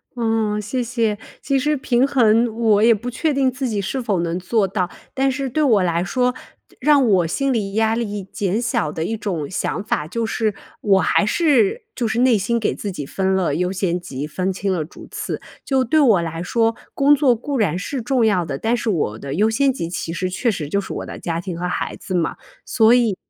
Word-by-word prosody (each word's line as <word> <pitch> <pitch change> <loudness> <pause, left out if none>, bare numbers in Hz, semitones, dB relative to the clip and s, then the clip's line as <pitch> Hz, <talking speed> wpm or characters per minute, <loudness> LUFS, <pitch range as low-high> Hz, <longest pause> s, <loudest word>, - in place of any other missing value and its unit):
嗯， 225 -3 0
谢 230 +5 -2
谢， 230 -3 0 0.2
其 275 -1 +1
实 300 +3 +1
平 255 -1 +2
衡 235 -3 +4
我 220 -3 +3
也 230 +1 +7
不 235 +4 -5
确 310 +5 0
定 270 -1 +2
自 255 +1 -3
己 210 -2 -1
是 230 +7 -2
否 205 -6 0
能 170 +1 -1
做 200 +2 +1
到， 185 -2 -1 0.2
但 270 0 +1
是 270 +1 -3
对 310 +6 0
我 225 -10 +4
来 170 -1 +1
说， 250 +5 +1 0.5
让 280 -1 +4
我 185 -5 +3
心 275 +10 0
理 200 -4 -2
压 220 0 +2
力 210 -4 -3
减 195 +1 -2
小 155 -10 0
的 160 - -3
一 225 - -2
种 180 -9 -3
想 190 - -2
法， 150 -7 -1
就 230 +7 -2
是 220 -2 -1 0.3
我 195 -2 +4
还 - - +2
是 345 - +2
就 240 - -1
是 220 +2 -1
内 250 -1 +5
心 235 +4 0
给 220 - 0
自 205 - -5
己 150 -6 -6
分 190 +6 0
了 180 -6 +1
优 180 +3 0
先 180 -2 -1
级， 140 -3 -5
分 185 +5 -2
清 190 +1 -1
了 170 -4 -1
主 155 - -12
次。 - - -4 0.2
就 265 -1 +1
对 285 +6 +2
我 225 - +5
来 165 0 -4
说， 225 +5 +1 0.2
工 285 +1 +5
作 270 -4 +3
固 275 +5 -3
然 205 -5 +1
是 250 +8 -4
重 245 0 +1
要 195 -5 +2
的， 145 -4 -4
但 225 +9 0
是 240 -1 -2
我 145 - -1
的 140 +2 -5
优 210 +5 +3
先 270 +5 +2
级 170 -10 -4
其 170 -1 -4
实 180 +2 -2
确 215 +7 0
实 170 -9 -2
就 200 +7 0
是 - - -8
我 - - -5
的 - - -8
家 165 -1 -2
庭 175 -1 -5
和 180 +1 -2
孩 180 - -3
子 185 - -5
嘛， 170 -2 0 0.3
所 220 0 +4
以 235 -5 +2
215 Hz, 245 characters per minute, -21 LUFS, 180-250 Hz, 0.5 s, 也